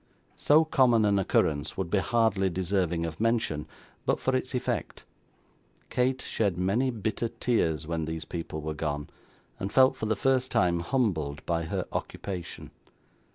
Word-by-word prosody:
So 155 Hz, +2 st, +5 dB
common 125 Hz, -8 st, +4 dB
an 100 Hz, -1 st, +3 dB
occurrence 75 Hz, -5 st, +1 dB
would 95 Hz, -3 st, -3 dB
be 100 Hz, -, +3 dB
hardly 100 Hz, -3 st, +2 dB
deserving 90 Hz, -2 st, 0 dB
of 80 Hz, -1 st, -6 dB
mention, 115 Hz, -10 st, 0 dB, 0.4 s
but -, -, +1 dB
for 130 Hz, -, 0 dB
its 130 Hz, 0 st, -2 dB
effect. 125 Hz, -, -3 dB, 0.9 s
Kate 130 Hz, +1 st, +1 dB
shed 100 Hz, -6 st, -1 dB
many 100 Hz, +9 st, +1 dB
bitter 110 Hz, 0 st, -2 dB
tears 85 Hz, -12 st, 0 dB
when 80 Hz, 0 st, -2 dB
these 80 Hz, 0 st, -4 dB
people 80 Hz, -2 st, -5 dB
were 80 Hz, +1 st, -3 dB
gone, 75 Hz, -1 st, -3 dB, 0.5 s
and 95 Hz, -, -3 dB
felt, 130 Hz, 0 st, +5 dB
for 110 Hz, -, -3 dB
the 110 Hz, -, +1 dB
first 130 Hz, +3 st, +1 dB
time, 85 Hz, -1 st, +2 dB
humbled 85 Hz, -, -1 dB
by 85 Hz, -1 st, 0 dB
her -, -, -2 dB
occupation. 90 Hz, -4 st, -5 dB
95 Hz, 155 wpm, -28 LUFS, 80-120 Hz, 0.9 s, So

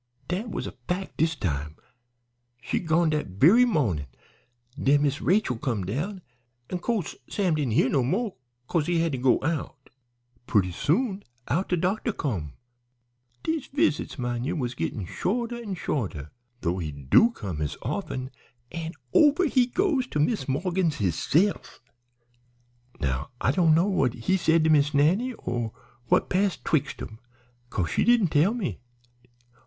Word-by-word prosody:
"Dat 195 Hz, +7 st, -2 dB
was -, -, -4 dB
a -, -, -5 dB, 0.2 s
fac' 185 Hz, +2 st, -3 dB
dis 160 Hz, +1 st, +1 dB
time; 75 Hz, -, -3 dB, 0.8 s
she'd 145 Hz, +8 st, -3 dB
gone 160 Hz, 0 st, +3 dB
dat 150 Hz, -1 st, -1 dB
very 160 Hz, -, +5 dB
mawnin'. 110 Hz, -, 0 dB, 0.7 s
Den 145 Hz, +1 st, +4 dB
Miss 145 Hz, +1 st, 0 dB
Rachel 180 Hz, -, +2 dB
come 115 Hz, -10 st, -2 dB
down, 170 Hz, -, -3 dB, 0.5 s
an' 180 Hz, -, -2 dB
co'se 210 Hz, -5 st, -2 dB
Sam 190 Hz, -5 st, +1 dB
didn't 145 Hz, -7 st, 0 dB
hear 125 Hz, -, +4 dB
no 135 Hz, 0 st, +2 dB
mo' 195 Hz, -, -1 dB, 0.3 s
'cause 165 Hz, -3 st, 0 dB
he 175 Hz, -1 st, +1 dB
had 165 Hz, -1 st, +1 dB
to 130 Hz, -, -3 dB
go 125 Hz, -1 st, +4 dB
out. 145 Hz, -3 st, -3 dB, 0.6 s
Purty 95 Hz, -5 st, +2 dB
soon 195 Hz, -, 0 dB, 0.3 s
out 170 Hz, +10 st, 0 dB
de 180 Hz, -, +2 dB
doctor 195 Hz, +7 st, 0 dB
come. 95 Hz, -, -3 dB, 0.9 s
Dese 320 Hz, -3 st, -2 dB
visits, 155 Hz, -, 0 dB
min' 120 Hz, -2 st, -2 dB
ye, 150 Hz, +7 st, -1 dB
was 125 Hz, -7 st, -2 dB
gittin' 105 Hz, -4 st, -3 dB
shorter 230 Hz, -, -2 dB
an' 215 Hz, -5 st, -5 dB
shorter, 95 Hz, -, -3 dB, 0.3 s
though 90 Hz, +1 st, -1 dB
he 80 Hz, -4 st, -3 dB
do 70 Hz, -, +4 dB
come 100 Hz, -, -6 dB
as 75 Hz, -, -3 dB
often, 130 Hz, +1 st, -3 dB, 0.4 s
an' 165 Hz, 0 st, -5 dB, 0.2 s
over 300 Hz, +4 st, +5 dB
he 255 Hz, -5 st, +3 dB
goes 290 Hz, -3 st, +1 dB
to 150 Hz, -, -3 dB
Mis' 150 Hz, -, +1 dB
Morgan's 170 Hz, +3 st, 0 dB
hisse'f. 145 Hz, -, 0 dB, 1.2 s
"Now 65 Hz, -, -2 dB
I -, -, +2 dB
doan' 160 Hz, +1 st, +4 dB
know 170 Hz, +3 st, +4 dB
what 135 Hz, -, +1 dB
he 120 Hz, +11 st, 0 dB
said 165 Hz, -3 st, +3 dB
to 160 Hz, -, +4 dB
Miss 145 Hz, -1 st, +3 dB
Nannie, 185 Hz, -, +3 dB
or 120 Hz, -, -3 dB, 0.3 s
what -, -, +3 dB
passed 195 Hz, 0 st, 0 dB
'twixt 145 Hz, -3 st, 0 dB
'em, 110 Hz, 0 st, -9 dB, 0.5 s
'cause 90 Hz, -8 st, -2 dB
she -, -, +2 dB
didn't 235 Hz, -7 st, +4 dB
tell 165 Hz, +10 st, +3 dB
me. 220 Hz, -8 st, -3 dB
155 Hz, 160 wpm, -26 LUFS, 120-195 Hz, 1.2 s, very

